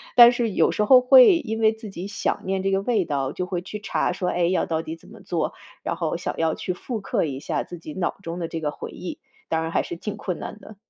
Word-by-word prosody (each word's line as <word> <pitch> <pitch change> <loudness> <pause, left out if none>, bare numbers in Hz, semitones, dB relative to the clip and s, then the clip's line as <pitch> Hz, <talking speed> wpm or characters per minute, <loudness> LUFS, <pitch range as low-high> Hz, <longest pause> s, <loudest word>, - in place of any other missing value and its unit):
但 240 0 +10
是 240 -2 -1
有 - - +3
时 210 - 0
候 255 +2 +8
会 405 - +8
因 225 -8 -4
为 220 0 +4
自 220 -1 -9
己 190 -1 -7
想 200 - -2
念 190 0 -1
这 195 - 0
个 195 - +2
味 220 -5 +2
道， 140 -4 -2
就 180 0 -4
会 175 -2 -2
去 210 +2 -6
查 210 - 0
说， 180 -1 -2
哎， 175 - +1
要 180 +2 +1
到 160 -1 -1
底 160 - -5
怎 165 - -18
么 - - -13
做， - - -2 0.3
然 - - -2
后 - - -2
想 - - -4
要 160 -1 +1
去 185 - -3
复 220 +5 -5
刻 195 - 0
一 135 -3 -4
下 - - -2
自 175 - -9
己 155 -2 -8
脑 180 -2 -1
中 170 -2 -5
的 170 -2 -3
这 165 0 -5
个 150 - 0
回 - - -7
忆， 180 - -7 0.3
当 160 0 0
然 160 - -3
还 - - +2
是 - - -6
挺 210 +4 -5
困 185 -4 -3
难 210 - -7
的。 215 - -13
185 Hz, 295 characters per minute, -24 LUFS, 165-220 Hz, 0.3 s, 但